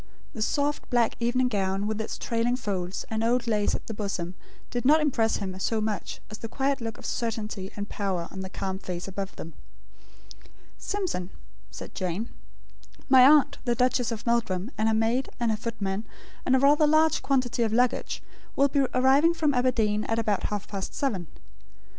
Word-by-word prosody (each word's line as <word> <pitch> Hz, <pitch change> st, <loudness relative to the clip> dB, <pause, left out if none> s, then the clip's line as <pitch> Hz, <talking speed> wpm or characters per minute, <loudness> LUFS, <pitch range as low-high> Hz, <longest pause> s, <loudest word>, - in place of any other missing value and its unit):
The 220 Hz, -, -6 dB
soft 290 Hz, +6 st, 0 dB
black 240 Hz, -3 st, +2 dB
evening 245 Hz, +2 st, +2 dB
gown, 195 Hz, -2 st, 0 dB
with 215 Hz, +1 st, -1 dB
its 220 Hz, -, -5 dB
trailing 235 Hz, +1 st, 0 dB
folds, 190 Hz, -6 st, -3 dB
and 220 Hz, 0 st, 0 dB
old 240 Hz, +1 st, +2 dB
lace 210 Hz, -3 st, +1 dB
at -, -, -7 dB
the 225 Hz, -, -5 dB
bosom, 195 Hz, -4 st, -3 dB, 0.4 s
did 245 Hz, -, -2 dB
not 300 Hz, +4 st, +6 dB
impress 245 Hz, -7 st, +2 dB
him 190 Hz, -2 st, -4 dB
so 220 Hz, +3 st, 0 dB
much 215 Hz, -3 st, -3 dB
as 215 Hz, -, -7 dB
the 230 Hz, -, -5 dB
quiet 270 Hz, +3 st, -1 dB
look 225 Hz, -1 st, -4 dB
of -, -, -11 dB
certainty 215 Hz, -4 st, -3 dB
and 205 Hz, 0 st, -4 dB
power 190 Hz, -6 st, -2 dB
on 190 Hz, -, -7 dB
the 190 Hz, 0 st, -5 dB
calm 190 Hz, 0 st, -4 dB
face 180 Hz, -2 st, -5 dB
above 195 Hz, 0 st, -5 dB
them. 165 Hz, -, -8 dB, 1.3 s
"Simpson," 365 Hz, -, -2 dB, 0.4 s
said -, -, -9 dB
Jane, 185 Hz, +4 st, -3 dB, 0.8 s
"my 260 Hz, -1 st, +8 dB
aunt, 295 Hz, 0 st, +5 dB
the 240 Hz, -2 st, +1 dB
Duchess 250 Hz, -1 st, +1 dB
of 225 Hz, -1 st, -5 dB
Meldrum, 230 Hz, -3 st, 0 dB
and 215 Hz, +1 st, +1 dB
her 220 Hz, -, +2 dB
maid, 230 Hz, +4 st, +1 dB
and 235 Hz, -2 st, +1 dB
her -, -, +1 dB
footman, 210 Hz, -2 st, -3 dB, 0.4 s
and 260 Hz, -, +5 dB
a -, -, +4 dB
rather 295 Hz, +3 st, +5 dB
large 310 Hz, +1 st, +4 dB
quantity 255 Hz, -3 st, +1 dB
of 225 Hz, -2 st, +2 dB
luggage, 245 Hz, +2 st, +1 dB, 0.3 s
will 280 Hz, +1 st, +4 dB
be 280 Hz, -, +1 dB, 0.2 s
arriving 275 Hz, +6 st, +5 dB
from 305 Hz, -3 st, +2 dB
Aberdeen, 225 Hz, -5 st, +2 dB
at 225 Hz, -, -1 dB
about 215 Hz, -4 st, 0 dB
half 210 Hz, -1 st, -3 dB
past 195 Hz, -2 st, -5 dB
seven. 200 Hz, -, -1 dB
225 Hz, 185 wpm, -27 LUFS, 200-255 Hz, 1.3 s, my